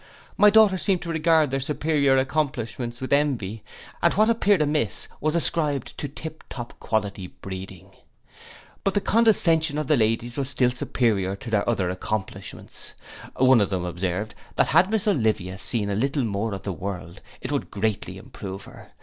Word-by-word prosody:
My 210 Hz, -, +7 dB
daughters 205 Hz, -3 st, +5 dB
seemed 190 Hz, -4 st, +1 dB
to 170 Hz, -, -6 dB
regard 160 Hz, -3 st, +3 dB
their 135 Hz, -, 0 dB
superior 145 Hz, -1 st, +1 dB
accomplishments 130 Hz, -4 st, -2 dB
with 130 Hz, -, -1 dB
envy; 120 Hz, -8 st, 0 dB, 0.4 s
and 170 Hz, -, +4 dB
what 215 Hz, +2 st, +4 dB
appeared 205 Hz, -4 st, +3 dB
amiss 150 Hz, 0 st, -1 dB
was 155 Hz, +2 st, 0 dB
ascribed 150 Hz, -5 st, 0 dB
to 145 Hz, -, -3 dB
tip 160 Hz, +3 st, -8 dB
top 120 Hz, -2 st, -7 dB
quality 100 Hz, -4 st, -2 dB
breeding. 95 Hz, -1 st, -9 dB, 0.9 s
But 195 Hz, -, 0 dB
the 205 Hz, -, +2 dB
condescension 170 Hz, -9 st, +3 dB
of 155 Hz, -, -1 dB
the 150 Hz, -, +3 dB
ladies 115 Hz, 0 st, 0 dB
was 140 Hz, -2 st, -1 dB
still 125 Hz, -3 st, +2 dB
superior 105 Hz, -6 st, 0 dB
to 115 Hz, +4 st, -9 dB
their 105 Hz, 0 st, +1 dB
other 95 Hz, -6 st, 0 dB
accomplishments. 95 Hz, +2 st, -5 dB, 0.4 s
One 130 Hz, -2 st, +5 dB
of 100 Hz, -, +1 dB
them 90 Hz, -3 st, -2 dB
observed, 90 Hz, +4 st, -3 dB, 0.2 s
that -, -, +3 dB
had 185 Hz, -, +5 dB
miss 220 Hz, -1 st, 0 dB
Olivia 110 Hz, -, 0 dB
seen 110 Hz, -3 st, +1 dB
a -, -, 0 dB
little 135 Hz, +5 st, 0 dB
more 105 Hz, -1 st, -2 dB
of 95 Hz, -, -9 dB
the 100 Hz, -, -3 dB
world, 90 Hz, 0 st, -6 dB, 0.2 s
it -, -, -5 dB
would -, -, -2 dB
greatly 105 Hz, 0 st, -2 dB
improve 95 Hz, 0 st, -8 dB
her. -, -, -14 dB
125 Hz, 170 wpm, -24 LUFS, 100-155 Hz, 0.9 s, My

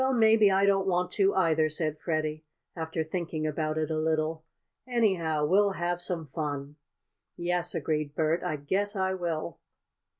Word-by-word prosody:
"Well, 265 Hz, 0 st, +2 dB
maybe 220 Hz, -3 st, +5 dB
I 195 Hz, +1 st, +3 dB
don't 195 Hz, -1 st, +2 dB
want 180 Hz, -1 st, +1 dB
to, 195 Hz, -1 st, +2 dB
either," 160 Hz, -4 st, +3 dB
said 155 Hz, 0 st, -2 dB
Freddie, 155 Hz, -2 st, -2 dB, 0.3 s
after 160 Hz, -1 st, -2 dB
thinking 160 Hz, -1 st, -3 dB
about 155 Hz, 0 st, -1 dB
it 155 Hz, 0 st, -1 dB
a 155 Hz, -, 0 dB
little. 160 Hz, 0 st, 0 dB, 0.4 s
"Anyhow 180 Hz, -11 st, +1 dB
we'll 200 Hz, +5 st, +3 dB
have 175 Hz, 0 st, -2 dB
some 175 Hz, -2 st, -2 dB
fun!" 145 Hz, -2 st, -4 dB, 0.6 s
"Yes," 175 Hz, 0 st, 0 dB
agreed 150 Hz, -2 st, -2 dB
Bert, 160 Hz, +2 st, +1 dB
"I 155 Hz, -, -2 dB
guess 195 Hz, +9 st, -1 dB
I 190 Hz, -1 st, 0 dB
will." 170 Hz, -4 st, -3 dB
165 Hz, 160 wpm, -28 LUFS, 155-190 Hz, 0.6 s, maybe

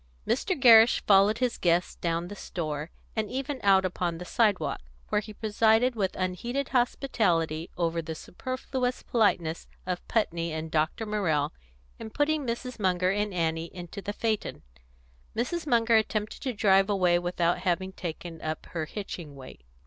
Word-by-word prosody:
Mr. 335 Hz, +6 st, 0 dB
Gerrish 230 Hz, -2 st, +7 dB
followed 200 Hz, +2 st, +5 dB
his 250 Hz, -1 st, -1 dB
guests 175 Hz, 0 st, +2 dB
down 170 Hz, 0 st, -2 dB
the 205 Hz, -, -8 dB
store, 155 Hz, -5 st, -4 dB, 0.3 s
and 215 Hz, -2 st, -1 dB
even 270 Hz, +1 st, -3 dB
out 190 Hz, -1 st, +5 dB
upon 175 Hz, -2 st, -2 dB
the 180 Hz, -, -7 dB
sidewalk, 210 Hz, -, +1 dB, 0.3 s
where 210 Hz, -, +2 dB
he 215 Hz, 0 st, -10 dB
presided 220 Hz, +3 st, +2 dB
with 195 Hz, -4 st, -1 dB
unheeded 235 Hz, +9 st, -2 dB
hospitality 180 Hz, -, +1 dB
over 170 Hz, -1 st, 0 dB
the 160 Hz, 0 st, -6 dB
superfluous 255 Hz, -, -4 dB
politeness 175 Hz, -8 st, +1 dB, 0.2 s
of 180 Hz, -1 st, -4 dB
Putney 170 Hz, -7 st, 0 dB
and 160 Hz, 0 st, -4 dB
Dr. 160 Hz, +8 st, 0 dB
Morrell 160 Hz, -9 st, 0 dB, 0.5 s
in 225 Hz, -, -6 dB
putting 290 Hz, +3 st, 0 dB
Mrs. 235 Hz, +1 st, -4 dB
Munger 185 Hz, -2 st, +2 dB
and 205 Hz, +1 st, -1 dB
Annie 165 Hz, -2 st, -1 dB
into 175 Hz, +3 st, -8 dB
the 205 Hz, -, -3 dB
phaeton. 215 Hz, 0 st, -2 dB, 0.7 s
Mrs. 310 Hz, +8 st, -2 dB
Munger 230 Hz, -3 st, +4 dB
attempted 215 Hz, -1 st, -1 dB
to 265 Hz, -, -1 dB
drive 195 Hz, -2 st, +4 dB
away 180 Hz, -4 st, +3 dB
without 175 Hz, 0 st, 0 dB
having 185 Hz, +1 st, -1 dB
taken 170 Hz, -2 st, -7 dB
up 155 Hz, 0 st, -4 dB
her 160 Hz, -2 st, -2 dB
hitching 170 Hz, -5 st, -7 dB
weight. 130 Hz, -, -12 dB
195 Hz, 155 wpm, -28 LUFS, 170-230 Hz, 0.7 s, Gerrish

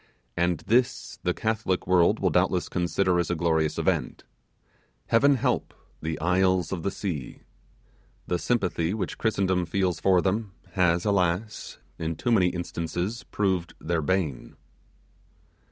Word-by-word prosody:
and 85 Hz, -1 st, 0 dB
this 125 Hz, +3 st, 0 dB
the 90 Hz, -, +1 dB
Catholic 110 Hz, -2 st, -1 dB
world 90 Hz, -1 st, +4 dB
will -, -, +1 dB
doubtless -, -, +1 dB
consider 90 Hz, +1 st, +1 dB
as 85 Hz, -, -1 dB
a 90 Hz, -, 0 dB
glorious 80 Hz, -2 st, +1 dB
event. -, -, -1 dB, 0.9 s
Heaven 140 Hz, +5 st, +5 dB
help 125 Hz, -, -1 dB, 0.3 s
the 80 Hz, -1 st, -3 dB
'Isles 90 Hz, 0 st, +2 dB
of 95 Hz, -3 st, -3 dB
the 100 Hz, -, -1 dB
Sea'! 85 Hz, -11 st, -5 dB, 0.8 s
The 90 Hz, -, -1 dB
sympathy 95 Hz, -6 st, 0 dB
which 110 Hz, -, -4 dB
Christendom 95 Hz, -5 st, +1 dB
feels 90 Hz, 0 st, 0 dB
for 95 Hz, -2 st, +4 dB
them, 100 Hz, +2 st, -1 dB, 0.2 s
has, 85 Hz, -1 st, +2 dB
alas! 100 Hz, +1 st, -1 dB, 0.2 s
in 80 Hz, 0 st, -2 dB
too 120 Hz, -, -1 dB
many 95 Hz, -6 st, +4 dB
instances 90 Hz, +4 st, -3 dB
proved 95 Hz, -4 st, -1 dB
their 85 Hz, 0 st, -1 dB
bane. 80 Hz, -5 st, -2 dB
90 Hz, 135 wpm, -26 LUFS, 85-100 Hz, 0.9 s, Heaven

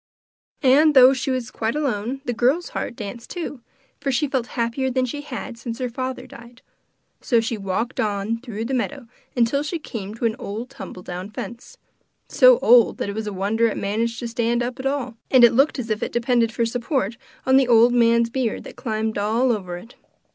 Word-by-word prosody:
And 290 Hz, +3 st, +5 dB
though 260 Hz, 0 st, +8 dB
she 260 Hz, +1 st, -3 dB
was 255 Hz, -3 st, -2 dB
quite 225 Hz, +3 st, -2 dB
alone, 265 Hz, -3 st, -2 dB
the 245 Hz, -, -1 dB
girl's 260 Hz, +9 st, +1 dB
heart 240 Hz, -, -4 dB
danced 225 Hz, +3 st, -7 dB
too, 320 Hz, -7 st, -5 dB, 0.4 s
for 280 Hz, -1 st, -1 dB
she 265 Hz, +4 st, +1 dB
felt 260 Hz, -3 st, -1 dB
happier 235 Hz, +3 st, 0 dB
than 255 Hz, 0 st, +1 dB
she 290 Hz, +4 st, -5 dB
had 245 Hz, -4 st, -7 dB
since 235 Hz, -1 st, -5 dB
her 250 Hz, -2 st, -3 dB
father 255 Hz, +2 st, -4 dB
died. 235 Hz, +1 st, -14 dB, 0.6 s
So 235 Hz, -, +2 dB
she 225 Hz, +1 st, -2 dB
walked 205 Hz, +4 st, -3 dB
on 210 Hz, +2 st, -1 dB
through 230 Hz, -3 st, -5 dB
the 265 Hz, -, -3 dB
meadow 260 Hz, +1 st, -2 dB, 0.4 s
till 280 Hz, +5 st, 0 dB
she 305 Hz, +4 st, -3 dB
came 215 Hz, -9 st, -7 dB
to 230 Hz, -, -3 dB
an 220 Hz, -1 st, +1 dB
old 225 Hz, +5 st, -6 dB
tumbledown 180 Hz, +1 st, -7 dB
fence 235 Hz, +3 st, -8 dB, 0.5 s
so -, -, +6 dB
old 235 Hz, -1 st, +6 dB
that -, -, -3 dB
it -, -, -3 dB
was 220 Hz, -1 st, -4 dB
a -, -, -2 dB
wonder 205 Hz, +4 st, +1 dB
it 220 Hz, -, -3 dB
managed 225 Hz, +3 st, -1 dB
to 240 Hz, -, -3 dB
stand 235 Hz, +1 st, 0 dB
up 250 Hz, +2 st, -5 dB
at 265 Hz, -, -1 dB
all, 270 Hz, -5 st, -3 dB
and 255 Hz, -2 st, +6 dB
it 240 Hz, -, +7 dB
looked 275 Hz, +6 st, +3 dB
as 235 Hz, -4 st, -4 dB
if 215 Hz, -, -1 dB
it -, -, -2 dB
depended 235 Hz, -1 st, +1 dB
for 230 Hz, +1 st, 0 dB
support 235 Hz, -1 st, -1 dB, 0.3 s
on 265 Hz, 0 st, +5 dB
the 270 Hz, -2 st, +4 dB
old 235 Hz, 0 st, +6 dB
man's 235 Hz, -1 st, +3 dB
beard 245 Hz, -3 st, -2 dB
that -, -, -11 dB
climbed 220 Hz, -2 st, -2 dB
all 230 Hz, +5 st, +2 dB
over 185 Hz, -6 st, -3 dB
it. 230 Hz, +7 st, -13 dB
235 Hz, 205 wpm, -22 LUFS, 225-260 Hz, 0.6 s, though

